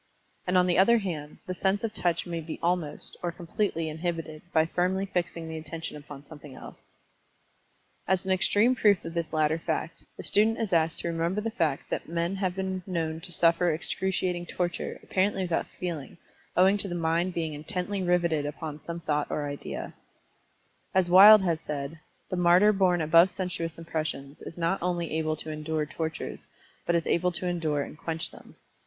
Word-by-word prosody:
And 180 Hz, +1 st, +3 dB
on 180 Hz, -, +5 dB
the 180 Hz, 0 st, +2 dB
other 235 Hz, +5 st, +6 dB
hand, 160 Hz, -8 st, -4 dB
the 185 Hz, -, -3 dB
sense 195 Hz, +3 st, 0 dB
of 225 Hz, -2 st, -2 dB
touch 175 Hz, -5 st, 0 dB
may 170 Hz, -2 st, -3 dB
be 155 Hz, 0 st, -6 dB
almost, 170 Hz, -4 st, -1 dB
or 175 Hz, -, -1 dB
completely 170 Hz, 0 st, -2 dB
inhibited, 160 Hz, -1 st, -4 dB
by 160 Hz, -1 st, +4 dB
firmly 185 Hz, +3 st, 0 dB
fixing 170 Hz, -3 st, -3 dB
the 160 Hz, 0 st, -5 dB
Attention 160 Hz, +1 st, -6 dB
upon 145 Hz, -1 st, -10 dB
something 145 Hz, -2 st, -12 dB
else. -, -, -11 dB, 1.3 s
As 190 Hz, 0 st, +1 dB
an 190 Hz, -, 0 dB
extreme 205 Hz, +6 st, +4 dB
proof 205 Hz, -8 st, +3 dB
of 165 Hz, -, -5 dB
this 170 Hz, -2 st, -2 dB
latter 155 Hz, 0 st, +2 dB
fact, 165 Hz, 0 st, -3 dB
the -, -, -7 dB
student 220 Hz, +3 st, +3 dB
is 215 Hz, -5 st, -2 dB
asked 165 Hz, -1 st, +2 dB
to -, -, -3 dB
remember 170 Hz, +4 st, 0 dB
the 225 Hz, +2 st, -2 dB
fact 160 Hz, -10 st, -1 dB
that -, -, -3 dB
men 170 Hz, +2 st, -1 dB
have 185 Hz, -2 st, -1 dB
been 190 Hz, -1 st, -2 dB
known 160 Hz, -3 st, -2 dB
to 180 Hz, +1 st, -10 dB
suffer 170 Hz, +1 st, +3 dB
excruciating 180 Hz, +1 st, -1 dB
torture, 175 Hz, 0 st, -3 dB
apparently 190 Hz, 0 st, +1 dB
without 175 Hz, -2 st, -1 dB
feeling, 170 Hz, -6 st, -5 dB, 0.4 s
owing 190 Hz, +3 st, +5 dB
to 200 Hz, -, -2 dB
the 175 Hz, -, -4 dB
mind 170 Hz, +2 st, 0 dB
being 160 Hz, -2 st, -2 dB
intently 180 Hz, +5 st, -3 dB
riveted 170 Hz, -4 st, +1 dB
upon 150 Hz, 0 st, -6 dB
some 170 Hz, 0 st, -6 dB
idea 150 Hz, -1 st, +1 dB
or 150 Hz, -, -2 dB, 0.5 s
thought. -, -, -17 dB, 1.0 s
As 185 Hz, -2 st, +3 dB
Wyld 205 Hz, +2 st, +10 dB
has 165 Hz, -3 st, 0 dB
said, 150 Hz, 0 st, -5 dB, 0.3 s
"The 185 Hz, -, -1 dB
martyr 180 Hz, +4 st, +6 dB
borne 185 Hz, -3 st, +3 dB
above 165 Hz, +4 st, +6 dB
sensuous 175 Hz, -3 st, -3 dB
impressions, 155 Hz, -4 st, -4 dB
is 165 Hz, -, -9 dB
not 170 Hz, +3 st, 0 dB
only 175 Hz, -2 st, -1 dB
able 155 Hz, 0 st, 0 dB
to 155 Hz, +1 st, -6 dB
endure 155 Hz, 0 st, -2 dB
tortures, 160 Hz, +1 st, -5 dB, 0.4 s
but 170 Hz, -, +3 dB
is 170 Hz, -, +1 dB
able 180 Hz, +1 st, +2 dB
to 180 Hz, -, -4 dB
endure 160 Hz, -5 st, 0 dB
and -, -, -9 dB
quench 165 Hz, 0 st, -4 dB
them. -, -, -15 dB
170 Hz, 185 wpm, -28 LUFS, 160-185 Hz, 1.3 s, Wyld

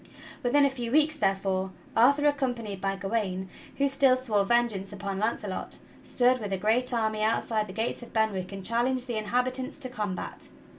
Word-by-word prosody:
Within 280 Hz, +4 st, +4 dB
a 280 Hz, -, +2 dB
few 240 Hz, -3 st, -4 dB
weeks, 305 Hz, +1 st, +3 dB
therefore, 195 Hz, -2 st, 0 dB, 0.3 s
Arthur 280 Hz, +6 st, +5 dB
accompanied 245 Hz, -9 st, -1 dB
by 195 Hz, 0 st, 0 dB
Gawain, 195 Hz, -1 st, -2 dB, 0.3 s
who 280 Hz, -, +3 dB
still 270 Hz, -2 st, +4 dB
swore 220 Hz, -6 st, +1 dB
vengeance 215 Hz, -3 st, +1 dB
upon 200 Hz, -1 st, -4 dB
Launcelot, 210 Hz, -3 st, -3 dB, 0.3 s
stood 250 Hz, +1 st, +2 dB
with 205 Hz, -3 st, -5 dB
a 195 Hz, -, 0 dB
great 225 Hz, +6 st, +1 dB
army 220 Hz, -2 st, 0 dB
outside 220 Hz, 0 st, +1 dB
the 185 Hz, -, -8 dB
gates 225 Hz, +5 st, -2 dB
of 240 Hz, -, -11 dB
Ben 220 Hz, -1 st, +2 dB
wick 185 Hz, 0 st, -4 dB
and 195 Hz, -1 st, -7 dB
challenged 245 Hz, +2 st, +1 dB
the 235 Hz, -3 st, -1 dB
inhabitants 255 Hz, +5 st, -1 dB
to 255 Hz, -, -1 dB
com 210 Hz, -6 st, -3 dB
bat. -, -, -5 dB
225 Hz, 185 wpm, -28 LUFS, 200-255 Hz, 0.3 s, Arthur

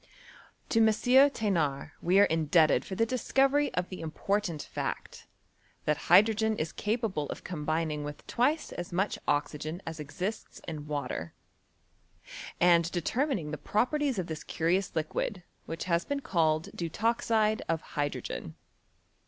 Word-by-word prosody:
To 225 Hz, -, +3 dB
M. 225 Hz, -, +6 dB
THenard 215 Hz, -, +3 dB
we 185 Hz, +3 st, +4 dB
are -, -, +8 dB
indebted 160 Hz, -1 st, +3 dB
for 190 Hz, -, -6 dB
the 225 Hz, -, +2 dB
discovery 270 Hz, +4 st, +2 dB
of 180 Hz, 0 st, -1 dB
the 185 Hz, -, -7 dB
important 170 Hz, +1 st, -2 dB
fact, -, -, -5 dB, 0.6 s
that 150 Hz, -, +3 dB
hydrogen 215 Hz, +4 st, +5 dB
is 155 Hz, +1 st, -2 dB
capable 210 Hz, -, -2 dB
of -, -, -6 dB
combining 155 Hz, -2 st, -2 dB
with 145 Hz, 0 st, -7 dB
twice 290 Hz, +6 st, 0 dB
as 175 Hz, -, -6 dB
much 190 Hz, +3 st, 0 dB
oxygen 150 Hz, +3 st, -1 dB
as 165 Hz, -1 st, -6 dB
exists 180 Hz, +9 st, -5 dB
in 150 Hz, -2 st, -6 dB
water, 125 Hz, -, -4 dB, 1.2 s
and 170 Hz, -1 st, +4 dB
determining 195 Hz, -, -1 dB
the 150 Hz, -, -5 dB
properties 270 Hz, +3 st, 0 dB
of 185 Hz, -, -1 dB
this 160 Hz, -2 st, -6 dB
curious 175 Hz, +4 st, 0 dB
liquid 170 Hz, +4 st, -2 dB, 0.2 s
which 165 Hz, -, -4 dB
has 170 Hz, -1 st, +1 dB
been 285 Hz, 0 st, -3 dB
called 160 Hz, -, +1 dB
deutoxide 220 Hz, +4 st, +1 dB
of 165 Hz, -1 st, 0 dB
hydrogen. 145 Hz, -, -3 dB
175 Hz, 135 wpm, -30 LUFS, 155-220 Hz, 1.2 s, are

